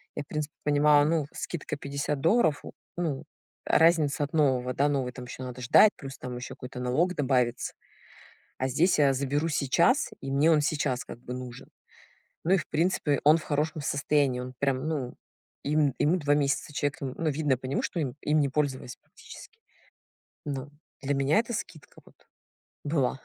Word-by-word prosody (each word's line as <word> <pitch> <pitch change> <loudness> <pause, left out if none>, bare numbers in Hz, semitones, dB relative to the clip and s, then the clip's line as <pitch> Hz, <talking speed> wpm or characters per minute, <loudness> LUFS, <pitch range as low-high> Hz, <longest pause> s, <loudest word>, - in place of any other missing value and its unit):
Я, - - -3
в - - -30
принципе, 150 -1 -4
понимала, 145 0 +5
ну, 160 -1 +1
скидка 170 -4 -5
50 140 0 -3
долларов. 165 - +3 0.3
Ну, 160 -6 -2 0.4
разница 155 -4 +3
от 145 - -5
нового, 130 -5 +2
да, 145 +2 +2
новый 135 -3 -1
там 125 0 -9
ещё 125 +1 -8
надо 125 0 -7
ждать, 205 - +6
плюс 135 0 -9
там 125 -1 -6
ещё 125 - -7
какой-то 125 0 -8
налог 135 +9 +1
добавится. 125 -3 0 0.9
А 130 - 0
здесь 155 +6 +2
я 140 -2 +5
заберу 140 +4 -1
сейчас, 170 - +2
и 135 - -5
мне 145 +4 +4
он 150 -2 +4
сейчас 145 -4 -1
как - - -10
бы 125 0 -7
нужен. 125 -1 -8 0.8
Ну 175 - +2
и - - +5
в 155 -5 -3
принципе, 155 -3 +1
он 155 +2 +7
в 165 - -5
хорошем 155 +1 -1
состоянии. 140 -3 +1
Он 125 0 -7
прям, 135 +1 0
ну, 140 -6 -3 0.5
ем 150 -1 +2
ему 160 +5 +3
2 145 -4 +2
месяца, 145 0 0
человек, 145 0 -2
н 130 -2 -4
ну, 165 - 0
видно 145 -2 +1
по 130 - -7
нему, 135 - -1
что 170 - -2
им 135 -5 -2
им 150 +1 +2
не 140 - +2
пользовались 135 -3 -2
практически. 455 - -14 0.9
Но 140 -2 -4 0.3
для 140 +1 -1
меня 140 +7 +2
это 235 +1 -1
скидка 155 -7 -8
вот - - -23 0.6
была. 140 -3 0
145 Hz, 180 wpm, -28 LUFS, 130-155 Hz, 0.9 s, он